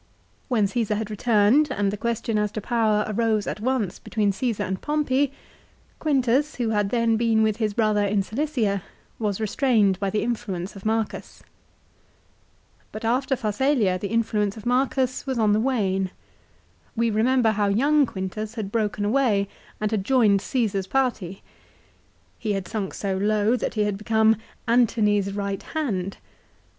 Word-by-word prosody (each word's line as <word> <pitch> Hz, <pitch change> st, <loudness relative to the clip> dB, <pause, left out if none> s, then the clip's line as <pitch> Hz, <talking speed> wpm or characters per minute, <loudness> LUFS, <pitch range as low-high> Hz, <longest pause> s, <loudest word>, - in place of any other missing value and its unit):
When 230 Hz, -6 st, +2 dB
Csesar 215 Hz, +1 st, -1 dB
had 215 Hz, 0 st, -4 dB
returned, 230 Hz, +7 st, +3 dB
and 205 Hz, -6 st, 0 dB
the -, -, -3 dB
question 225 Hz, 0 st, -1 dB
as 210 Hz, -1 st, 0 dB
to -, -, -3 dB
power 215 Hz, -1 st, +1 dB
arose 220 Hz, -1 st, 0 dB
at -, -, -4 dB
once 230 Hz, -5 st, -1 dB
between 210 Hz, -3 st, 0 dB
Csesar 210 Hz, 0 st, -2 dB
and 190 Hz, 0 st, -3 dB
Pompey, 285 Hz, -2 st, +1 dB, 0.7 s
Quintus 275 Hz, 0 st, +1 dB
who 240 Hz, -3 st, -1 dB
had 205 Hz, -2 st, +1 dB
then 230 Hz, -1 st, +2 dB
been 225 Hz, -1 st, +2 dB
with 215 Hz, -1 st, +1 dB
his 215 Hz, -3 st, -1 dB
brother 215 Hz, -2 st, +2 dB
in 200 Hz, 0 st, +1 dB
Cilicia, 225 Hz, -5 st, -1 dB, 0.4 s
was 210 Hz, -3 st, -1 dB
restrained 215 Hz, -4 st, +2 dB
by 200 Hz, -1 st, 0 dB
the 210 Hz, +2 st, -1 dB
influence 210 Hz, -6 st, -3 dB
of 195 Hz, +2 st, -6 dB
Marcus. 220 Hz, -1 st, -3 dB, 1.5 s
But 215 Hz, +1 st, -6 dB
after 260 Hz, +4 st, +1 dB
Pharsalia 215 Hz, -4 st, +1 dB
the 200 Hz, +1 st, -4 dB
in 230 Hz, 0 st, +3 dB
fluence 210 Hz, -1 st, -1 dB
of 215 Hz, -, -10 dB
Mure 255 Hz, +2 st, +2 dB
us 255 Hz, +1 st, -1 dB
was 260 Hz, -2 st, -1 dB
on 215 Hz, -2 st, +3 dB
the 210 Hz, -, +3 dB
wane. 195 Hz, -7 st, 0 dB, 0.9 s
We 230 Hz, 0 st, +1 dB
remember 230 Hz, +2 st, +3 dB
how 205 Hz, -1 st, 0 dB
young 280 Hz, +8 st, +3 dB
Quintus 210 Hz, +3 st, -5 dB
had 210 Hz, -4 st, -4 dB
broken 210 Hz, -2 st, -1 dB
away 210 Hz, -4 st, +2 dB, 0.3 s
and 215 Hz, 0 st, -1 dB
had 210 Hz, -3 st, 0 dB
joined 215 Hz, -5 st, +3 dB
Caesar's 200 Hz, -5 st, -1 dB
party. 230 Hz, -9 st, -1 dB, 1.0 s
He 215 Hz, -2 st, -1 dB
had 195 Hz, -2 st, -3 dB
sunk 200 Hz, -2 st, -4 dB
so 195 Hz, -2 st, -2 dB
low 210 Hz, +3 st, +2 dB
that 250 Hz, -, -3 dB
he 210 Hz, -, +2 dB
had 205 Hz, -1 st, -2 dB
become 220 Hz, 0 st, +3 dB, 0.2 s
" -, -, -35 dB
Antony's 210 Hz, -4 st, +2 dB
right 200 Hz, -1 st, -3 dB
hand." 200 Hz, -, -3 dB
215 Hz, 165 wpm, -24 LUFS, 205-240 Hz, 1.5 s, returned